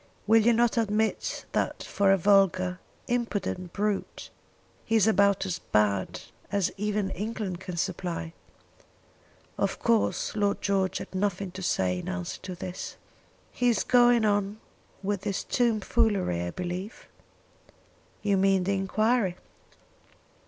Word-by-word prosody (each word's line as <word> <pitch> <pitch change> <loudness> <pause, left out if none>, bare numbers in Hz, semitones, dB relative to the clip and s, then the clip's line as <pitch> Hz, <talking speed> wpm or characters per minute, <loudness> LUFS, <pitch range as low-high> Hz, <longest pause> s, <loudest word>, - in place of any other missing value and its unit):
Will 225 +1 +5
you 235 - +5
not 235 0 +2
admit 220 0 -1
that - - -1
for 200 -1 +2
a 195 - +5
vulgar, 185 -1 +3 0.3
impudent 205 -7 -2
brute, 205 0 -3 0.5
he 225 - 0
is 215 -3 +5
about 200 -3 +3
as 180 -2 -3
bad 100 - 0 0.3
as 200 -3 +1
even 210 -1 -1
England 205 -3 -4
can 185 -2 -6
supply?" 170 -2 -3 1.3
Of - - 0
course 230 -2 +1
Lord 205 -1 +1
George 195 -1 0
had - - -8
nothing 195 -1 -1
to 190 - -8
say 90 - 0
in - - -6
answer 90 -1 -4
to 185 -1 -6
this. 180 +1 -6 0.6
"He 245 0 +1
is 235 - +2
going 240 -2 +5
on 205 0 0 0.4
with 200 -1 -1
this 200 -2 -2
tom 235 -3 +1
foolery, 200 - +1
I 85 - -2
believe?" 180 - -5 1.2
"You 200 -2 +2
mean 195 -1 +3
the 200 +2 0
enquiry?" 200 +1 +1
200 Hz, 135 wpm, -27 LUFS, 185-215 Hz, 1.3 s, Will